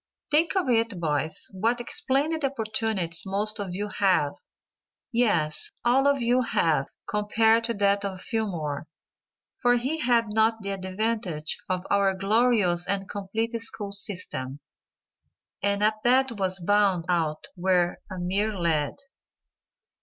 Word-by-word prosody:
Think 320 +5 +3
of 375 -7 +1
it 230 -5 +1
boys, 155 -1 -1
what 230 +5 -1
splendid 310 -5 0
opportunities 220 -9 0
most 210 +2 0
of 190 -3 -4
you 205 +2 -3
have; 185 -8 +2 0.8
yes, 175 -11 +2 0.2
all 265 +3 +4
of 280 -3 +2
you 245 +2 +3
have, 160 - +1 0.2
compared 220 +2 +2
to 235 0 0
that 200 0 +2
of 190 -2 -4
Fillmore, 170 -10 -3 0.7
for 245 -1 +4
he 265 +7 -1
had 235 -5 +2
not 220 0 +2
the 200 - -3
advantage 190 -4 -2
of 185 0 -2
our 200 -1 +3
glorious 195 -3 +2
and 195 -1 -1
complete 205 +4 -3
school 210 -3 -2
system, 175 -9 -2 1.0
and 200 +1 0
at 215 0 +1
that 260 +2 +4
was 190 -3 0
bound 195 -2 +2
out 160 -4 -1
when 180 -1 +1
a 185 - -6
mere 200 +4 -1
lad. 160 -4 0
205 Hz, 130 wpm, -26 LUFS, 180-230 Hz, 1.0 s, all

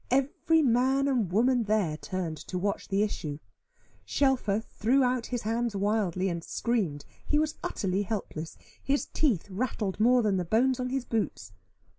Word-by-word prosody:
Every 285 +5 +2
man 265 +2 +3
and 240 -10 +1
woman 240 +4 +3
there 205 -7 +1
turned 170 -1 -4
to 185 - -3
watch 200 +2 -2
the 200 +1 +2
issue. 155 -8 -3 0.7
Shelfer 255 -7 +1
threw 240 +4 +1
out 250 -1 0
his 245 -2 -3
hands 230 0 -1
wildly, 195 -2 0
and 170 -2 -3
screamed: 190 -14 -1 0.2
he 295 - +1
was 310 0 0
utterly 190 0 -1
helpless, 195 -6 -4 0.2
his 280 +1 0
teeth 240 - 0
rattled 210 -2 -2
more 245 +2 +5
than 205 -3 +2
the 180 - 0
bones 250 +8 +2
on 250 0 -1
his 265 -1 -2
boots. 220 - -2
220 Hz, 160 wpm, -28 LUFS, 190-255 Hz, 0.7 s, more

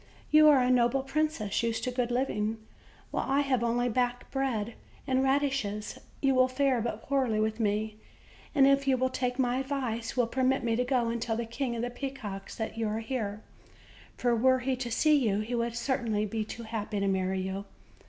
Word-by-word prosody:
"You 305 0 +7
are 275 -4 +6
a 250 - +2
noble 250 +2 +3
princess, 270 -7 -1
used 230 -1 -1
to 250 - -1
good 245 -1 -1
living, 225 -4 -1 0.5
while - - -2
I 275 +1 +3
have 260 -4 +1
only 240 +1 +1
back 245 +1 -1
bread 235 -5 -1 0.3
and 260 0 +1
radishes; 270 -7 0 0.2
you 270 -1 +4
will 255 0 +5
fare 260 -1 +1
but 220 -1 -4
poorly 260 -6 +1
with 220 +1 0
me, 215 0 -1 0.6
and, 275 -2 +6
if 275 0 +3
you 265 -1 +4
will 260 +1 0
take 250 -1 -1
my 250 -1 +1
advice, 260 -4 -3
will 245 - +4
permit 260 +2 +1
me 230 -1 +1
to 250 - +1
go 245 -2 +1
and 235 0 -2
tell 225 -1 -1
the 235 - -2
King 240 +1 -3
of 230 - -3
the 245 - -2
Peacocks 240 -7 -6
that 225 0 -4
you 225 - 0
are 210 +1 -1
here; 220 -3 -3 0.7
for 245 -1 +2
were 260 +3 +4
he 260 +1 0
to 250 -1 -4
see 305 +6 +3
you, 210 -5 +1
he 225 +3 -5
would 235 -1 -1
certainly 235 -4 0
be 220 +1 -3
but 215 - -5
too 235 - -6
happy 215 -2 -3
to 200 - 0
marry 190 0 0
you." 190 +1 -4
240 Hz, 210 wpm, -29 LUFS, 220-265 Hz, 0.7 s, You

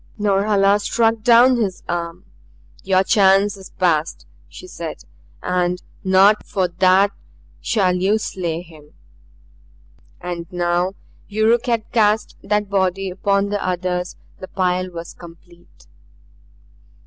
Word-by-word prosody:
Norhala 200 0 +2
struck 225 +2 0
down 245 +3 +5
his 200 -6 -2
arm. 170 +1 -4 0.6
"Your 190 0 +2
chance 195 0 +3
has 195 -2 -12
passed," 165 -3 -1 0.2
she - - -12
said, - - -8 0.4
"and 180 0 -1 0.2
not 195 +3 +4
for 190 -2 -1
THAT 185 +3 +3 0.5
shall 190 -5 +1
you 190 +4 +1
slay 175 -5 -4
him." 155 -4 -18 1.2
And 175 -2 -6
now 175 +1 0 0.3
Yuruk 225 +3 +1
had 230 -2 -1
cast 215 -1 +1
that 210 0 -1
body 195 -1 -1
upon 200 +2 0
the 205 0 -2
others; 180 0 -2 0.2
the 185 - -8
pile 185 -1 -1
was 170 -1 -8
complete. 170 0 -17
190 Hz, 115 wpm, -20 LUFS, 180-205 Hz, 1.2 s, down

